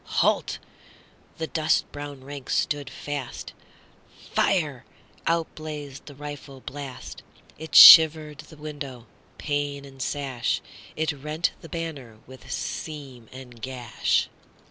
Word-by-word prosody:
"Halt!"—the 160 Hz, -, -3 dB
dust 155 Hz, -1 st, 0 dB
brown 145 Hz, -2 st, -8 dB
ranks 140 Hz, -1 st, -5 dB
stood 145 Hz, -2 st, -1 dB
fast,"Fire!"—out 145 Hz, +3 st, -4 dB
blazed 150 Hz, -3 st, -8 dB
the 145 Hz, -, -10 dB
rifle 145 Hz, -1 st, -9 dB
blast.It 145 Hz, +3 st, -10 dB
shivered 155 Hz, -2 st, +10 dB
the 155 Hz, 0 st, -12 dB
window, 145 Hz, -5 st, -7 dB, 0.3 s
pane 145 Hz, -1 st, -2 dB
and 135 Hz, -1 st, -12 dB
sash; 135 Hz, -3 st, -1 dB, 0.4 s
It 160 Hz, +1 st, 0 dB
rent 150 Hz, +4 st, -2 dB
the 165 Hz, -, -11 dB
banner 145 Hz, -9 st, -6 dB
with 130 Hz, 0 st, -13 dB
seam 135 Hz, -6 st, -6 dB
and 125 Hz, -3 st, -12 dB
gash. 125 Hz, -2 st, -1 dB
145 Hz, 100 wpm, -25 LUFS, 130-155 Hz, 0.4 s, shivered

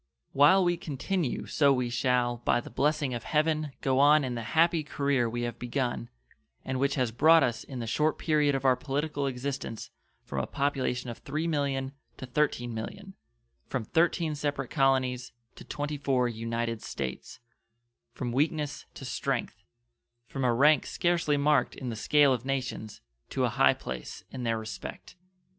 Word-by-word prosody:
While 150 Hz, +8 st, +6 dB
we 175 Hz, -1 st, +1 dB
continue 155 Hz, 0 st, -2 dB
so 140 Hz, -2 st, +3 dB
we 125 Hz, -3 st, 0 dB
shall 125 Hz, -1 st, +1 dB
by 120 Hz, -, +1 dB
the -, -, -9 dB
blessing 145 Hz, -2 st, +1 dB
of 120 Hz, -, -4 dB
Heaven 155 Hz, -1 st, 0 dB
go 135 Hz, -1 st, +2 dB
on 145 Hz, +1 st, +6 dB
in 130 Hz, -2 st, -2 dB
the 120 Hz, -, -3 dB, 0.2 s
happy 165 Hz, 0 st, +4 dB
career 140 Hz, -4 st, 0 dB
we 120 Hz, +1 st, -3 dB
have 120 Hz, -1 st, -4 dB
begun, 125 Hz, -1 st, -2 dB, 0.6 s
and 130 Hz, -1 st, -2 dB
which 140 Hz, +1 st, +1 dB
has 125 Hz, -4 st, 0 dB
brought 160 Hz, +7 st, +6 dB
us 120 Hz, -1 st, -1 dB
in 135 Hz, -, -8 dB
the 120 Hz, -, -3 dB
short 150 Hz, +7 st, +1 dB
period 150 Hz, -3 st, +2 dB
of 135 Hz, 0 st, -3 dB
our 130 Hz, -1 st, +5 dB
political 145 Hz, +2 st, -2 dB
existence 130 Hz, -3 st, -4 dB, 0.3 s
from -, -, -4 dB
a -, -, -2 dB
population 130 Hz, -3 st, -1 dB
of 115 Hz, -, -12 dB
3,000,000 145 Hz, -4 st, -1 dB, 0.3 s
to -, -, -7 dB
13,000,000; 125 Hz, -, -2 dB, 0.5 s
from 125 Hz, -4 st, -3 dB
13 165 Hz, -, +1 dB
separate 145 Hz, -3 st, -3 dB
colonies 130 Hz, -3 st, +1 dB, 0.2 s
to -, -, -11 dB
24 140 Hz, -4 st, -1 dB
united 115 Hz, 0 st, -3 dB
States; 65 Hz, -2 st, -6 dB, 0.7 s
from 120 Hz, -2 st, -4 dB
weakness 150 Hz, +2 st, -1 dB
to -, -, -8 dB
strength; -, -, -2 dB, 0.7 s
from 135 Hz, +1 st, -4 dB
a 125 Hz, -, +3 dB
rank 140 Hz, +4 st, +4 dB
scarcely 170 Hz, -4 st, +1 dB
marked 145 Hz, -1 st, +2 dB
in 130 Hz, -, -5 dB
the 115 Hz, -, -4 dB
scale 140 Hz, +5 st, +4 dB
of 125 Hz, -2 st, -3 dB
nations 130 Hz, -5 st, -4 dB, 0.3 s
to -, -, -1 dB
a -, -, +1 dB
high -, -, +4 dB
place 60 Hz, -1 st, -7 dB
in 130 Hz, -, -6 dB
their 115 Hz, -2 st, 0 dB
respect. 110 Hz, 0 st, -8 dB
135 Hz, 160 wpm, -29 LUFS, 120-150 Hz, 0.7 s, While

